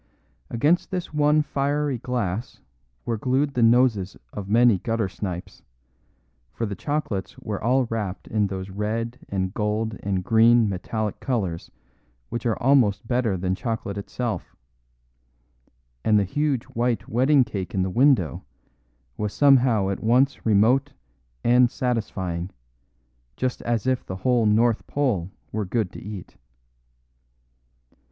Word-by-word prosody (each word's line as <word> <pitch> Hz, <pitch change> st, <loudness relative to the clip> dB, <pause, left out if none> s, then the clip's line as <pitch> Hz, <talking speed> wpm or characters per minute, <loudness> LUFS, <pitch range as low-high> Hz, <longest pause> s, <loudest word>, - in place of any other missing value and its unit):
Against 145 Hz, +9 st, +2 dB
this 180 Hz, -4 st, -4 dB
one 150 Hz, 0 st, +3 dB
fiery 145 Hz, -2 st, -1 dB
glass 120 Hz, -3 st, -3 dB, 0.5 s
were 115 Hz, -2 st, -2 dB
glued 135 Hz, +4 st, +1 dB
the 125 Hz, -, 0 dB
noses 115 Hz, -5 st, +3 dB, 0.2 s
of 100 Hz, -1 st, -6 dB
many 115 Hz, -2 st, +5 dB
gutter 115 Hz, +1 st, -1 dB
snipes, 90 Hz, -2 st, -6 dB, 0.9 s
for 115 Hz, -, -3 dB
the 105 Hz, -, -4 dB
chocolates 130 Hz, -7 st, -3 dB
were 105 Hz, -2 st, -5 dB
all 125 Hz, +3 st, +3 dB
wrapped 105 Hz, -5 st, -4 dB
in 105 Hz, -1 st, +1 dB
those 95 Hz, 0 st, -6 dB
red 115 Hz, +4 st, -3 dB
and 95 Hz, -1 st, -2 dB
gold 110 Hz, +1 st, -2 dB
and 95 Hz, -2 st, -1 dB
green 115 Hz, +3 st, +5 dB
metallic 105 Hz, +2 st, -3 dB
colours 95 Hz, -11 st, -2 dB, 0.6 s
which 120 Hz, 0 st, -3 dB
are 110 Hz, -, 0 dB
almost 125 Hz, -5 st, +3 dB
better 120 Hz, -5 st, +1 dB
than 90 Hz, +1 st, -1 dB
chocolate 110 Hz, -1 st, -3 dB
itself; 110 Hz, +3 st, -4 dB, 1.5 s
and 105 Hz, -1 st, +4 dB
the 100 Hz, -, +3 dB
huge 140 Hz, +5 st, 0 dB
white 120 Hz, -2 st, -2 dB
wedding 130 Hz, +4 st, +4 dB
cake 95 Hz, -6 st, -5 dB
in 95 Hz, -, +2 dB
the 95 Hz, -, -1 dB
window 120 Hz, -, +3 dB, 0.7 s
was 105 Hz, -1 st, -2 dB
somehow 125 Hz, -5 st, +4 dB
at 95 Hz, -, -3 dB
once 125 Hz, +3 st, +2 dB
remote 120 Hz, +7 st, +3 dB, 0.5 s
and 125 Hz, +1 st, +5 dB
satisfying, 95 Hz, -9 st, -2 dB, 0.9 s
just 130 Hz, -1 st, -2 dB
as 115 Hz, -3 st, -1 dB
if 130 Hz, -1 st, +1 dB
the 95 Hz, -, -6 dB
whole 115 Hz, +3 st, +2 dB
North 115 Hz, +2 st, +2 dB
Pole 115 Hz, -12 st, 0 dB, 0.2 s
were 110 Hz, 0 st, -2 dB
good 100 Hz, 0 st, -1 dB
to -, -, -10 dB
eat. 100 Hz, -2 st, -9 dB
115 Hz, 130 wpm, -24 LUFS, 100-125 Hz, 1.5 s, many